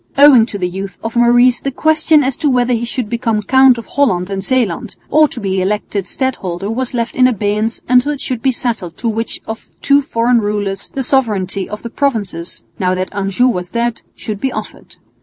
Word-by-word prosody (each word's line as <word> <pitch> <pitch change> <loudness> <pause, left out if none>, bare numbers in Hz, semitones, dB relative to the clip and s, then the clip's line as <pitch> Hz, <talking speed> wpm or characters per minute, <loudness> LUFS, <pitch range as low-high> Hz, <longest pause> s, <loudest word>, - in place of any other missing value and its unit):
Owing 275 -5 +7
to 205 - -5
the 180 -2 -1
youth 190 +1 -6
of 225 +1 -4
Maurice 240 +1 +4
the 275 - -2
question 310 +2 +3
as 265 0 0
to 300 - +2
whether 250 -1 +2
he 235 0 -1
should 235 -1 -3
become 225 -2 -1
Count 260 +2 +5
of 230 - -7
Holland 200 -10 0
and 195 -1 -3
Zeeland 230 -2 -1 0.2
or 310 0 +5
be 195 -8 -2
elected 200 0 -2
Stadholder 200 -7 -3
was 250 +2 -3
left 235 -1 -2
in 255 0 +5
abeyance 215 -1 -1
until 250 +3 +3
it 290 - -4
should 250 -4 -3
be 265 - +2
settled 225 -9 -3
to 235 - -3
which 225 +1 -2
of 220 0 -7 0.2
two 280 0 +4
foreign 240 -4 +1
rulers 205 -2 -3
the 270 - -4
sovereignty 210 -8 0
of 210 +1 -7
the 235 - -5
provinces, 210 - -2 0.2
now 185 -1 +1
that 185 0 -4
Anjou 200 +5 +1
was 180 -7 -2
dead, 235 -1 -2
should 210 -2 -6
be 265 - 0
offered. - - -8
230 Hz, 200 wpm, -16 LUFS, 200-255 Hz, 0.2 s, Owing